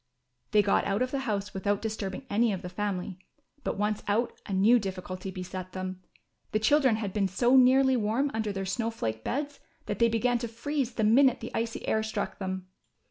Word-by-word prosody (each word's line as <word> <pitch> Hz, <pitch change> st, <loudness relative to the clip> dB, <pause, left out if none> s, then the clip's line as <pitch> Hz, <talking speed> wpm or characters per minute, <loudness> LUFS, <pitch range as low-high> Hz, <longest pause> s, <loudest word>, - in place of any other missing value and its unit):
They 210 Hz, -1 st, +4 dB
got 200 Hz, -, +2 dB
out 200 Hz, +5 st, +1 dB
of 255 Hz, -, -3 dB
the 275 Hz, -, -1 dB
house 205 Hz, -1 st, -2 dB
without 200 Hz, +1 st, 0 dB
disturbing 215 Hz, 0 st, -4 dB
any 225 Hz, +1 st, +2 dB
of 190 Hz, -, -4 dB
the 180 Hz, -, -5 dB
family; 185 Hz, -1 st, -3 dB, 0.4 s
but, -, -, -2 dB
once 210 Hz, +1 st, 0 dB
out, 225 Hz, +4 st, +1 dB
a -, -, -6 dB
new 210 Hz, +6 st, +5 dB
difficulty 185 Hz, -1 st, -5 dB
beset 185 Hz, 0 st, -6 dB
them. 185 Hz, 0 st, -5 dB, 0.5 s
The 215 Hz, -, +3 dB
children 260 Hz, +1 st, +4 dB
had 205 Hz, -3 st, -3 dB
been 200 Hz, -2 st, +1 dB
so 240 Hz, +7 st, +3 dB
nearly 265 Hz, +1 st, +6 dB
warm 240 Hz, +5 st, +1 dB
under 220 Hz, -1 st, -1 dB
their 195 Hz, -1 st, -3 dB
snow 225 Hz, +4 st, -1 dB
flake 110 Hz, -, -4 dB
beds 285 Hz, +2 st, -3 dB, 0.3 s
that -, -, -3 dB
they 235 Hz, -1 st, +5 dB
began 240 Hz, +2 st, +1 dB
to 235 Hz, -, -3 dB
freeze 250 Hz, +2 st, -3 dB
the 220 Hz, -, 0 dB
minute 250 Hz, +5 st, +5 dB
the -, -, -7 dB
icy 230 Hz, 0 st, -3 dB
air 220 Hz, -, +2 dB
struck 220 Hz, 0 st, -3 dB
them. 190 Hz, -1 st, -4 dB
215 Hz, 200 wpm, -28 LUFS, 190-240 Hz, 0.5 s, nearly